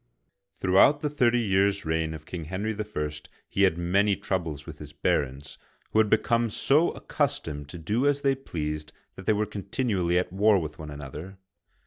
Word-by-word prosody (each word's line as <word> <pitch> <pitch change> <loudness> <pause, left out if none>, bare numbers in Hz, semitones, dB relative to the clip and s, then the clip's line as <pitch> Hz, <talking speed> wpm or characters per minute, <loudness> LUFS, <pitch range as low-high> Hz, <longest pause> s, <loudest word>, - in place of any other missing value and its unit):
Throughout 100 +10 +4
the 150 - -1
thirty 120 -4 +3
years* 100 -2 +2
reign 80 0 -1
of 80 0 -10
King 85 -3 -6
Henry 95 +7 -2
I., 105 -8 -3 0.4
he 100 - -1
had 95 -4 +4
many 100 +4 +2
troubles 85 -8 -3
with - - -10
his - - -10
barons, 70 +1 -1 0.3
who 110 - +3
had 110 -1 +4
become 115 +2 +2
so 145 +9 +3
accustomed 80 - -2
to 85 - -8
do 105 - 0
as 145 0 +2
they 135 -1 +4
pleased 75 - -5 0.2
that 95 - -11
they 110 - +5
were 105 +1 +1
continu 105 +1 -2
ally 85 0 +1
at 90 0 0
war 105 +1 +4
with 80 -2 -4
one 80 -1 -7
another. 75 +6 -8
95 Hz, 180 wpm, -27 LUFS, 80-110 Hz, 0.4 s, they